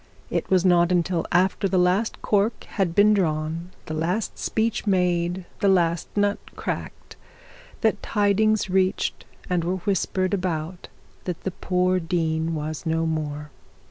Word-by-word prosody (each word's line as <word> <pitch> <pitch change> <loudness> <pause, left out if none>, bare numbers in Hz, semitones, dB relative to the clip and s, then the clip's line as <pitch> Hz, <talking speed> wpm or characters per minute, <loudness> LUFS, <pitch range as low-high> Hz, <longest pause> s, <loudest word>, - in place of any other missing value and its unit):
It - - -1
was 185 -1 +3
not 175 -1 +4
till 175 -3 -1
after 190 +2 +2
the 190 0 0
last 180 +5 +1
cork 210 +2 +1
had 185 -5 -2
been 210 +1 +6
drawn, 165 -2 -1 0.2
the 155 - -5
last 175 +7 -1
speech 225 0 -1
made, 180 -1 +1
the 200 - +2
last 170 -3 +2
nut 205 0 +2 0.2
cracked, - - -5 0.7
that 220 -2 +1
tidings 210 0 +2
reached 190 0 0 0.2
and 180 -2 0
were 180 +2 0
whispered 190 -1 0
about 175 -2 -3 0.4
that 180 -3 -4
the 190 - -3
poor 180 0 +1
dean 165 -1 -1
was 155 0 -4
no 165 0 0
more. 150 -2 -3
180 Hz, 140 wpm, -24 LUFS, 165-195 Hz, 0.7 s, been